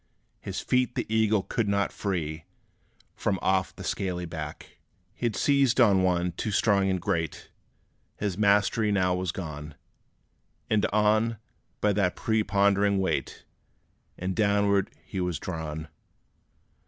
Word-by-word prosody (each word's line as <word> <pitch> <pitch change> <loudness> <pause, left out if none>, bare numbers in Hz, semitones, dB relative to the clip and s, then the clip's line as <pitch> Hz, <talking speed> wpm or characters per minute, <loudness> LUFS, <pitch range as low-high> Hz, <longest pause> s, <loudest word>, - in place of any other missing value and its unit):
His - - -5
feet 125 -1 +1
the - - -1
eagle 110 -2 +3
could 115 -3 -1
not 100 0 +1
free 80 -5 -3 0.7
From 100 -2 0
off 95 0 0
the - - -9
scaly 90 -2 -2
back. 80 -3 -8 0.3
He 120 +1 -1
'd 110 - -7
seized 140 -3 +3
on 100 -6 +5
one 90 -1 +1
too 90 - -4
strong 100 -1 +2
and 95 -1 0
great; 80 -1 -3 0.7
His 100 -4 -2
mastery 105 +1 +3
now 90 -2 +2
was 90 -1 -1
gone! 75 -4 -7 1.0
And 110 -1 +3
on, 110 +2 +2 0.4
by 105 -1 +3
that 95 -3 +1
prepondering 100 -2 +2
weight, 95 -1 -2 0.7
And 90 +1 -3
downward, 100 -2 +2 0.2
he 95 - -4
was 90 -3 -1
drawn. 80 -3 -5
100 Hz, 130 wpm, -27 LUFS, 90-105 Hz, 1.0 s, on